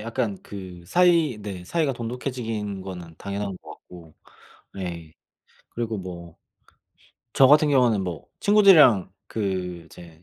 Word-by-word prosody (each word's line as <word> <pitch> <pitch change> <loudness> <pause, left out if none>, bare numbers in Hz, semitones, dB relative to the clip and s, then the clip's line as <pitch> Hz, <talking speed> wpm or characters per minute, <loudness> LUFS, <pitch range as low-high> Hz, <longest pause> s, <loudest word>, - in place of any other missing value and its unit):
약간 115 -2 -2
그 95 -3 -10
사이 170 - +3
네 95 -3 -7
사이가 155 - 0
돈독해지는 115 -4 -4
거는 90 -3 -9
당연한 100 -1 -4
것 - - -14
같고 85 -3 -15 0.6
예 85 -4 -6 0.6
그리고 115 -2 -4
뭐 85 -3 -9 1.0
저 135 - +8
같은 150 +2 +6
경우는 125 -7 +3
뭐 85 -5 -6
친구들이랑 160 - +6
그 95 -5 -3
이제 80 0 -15
100 Hz, 245 characters per minute, -24 LUFS, 90-125 Hz, 1.0 s, 저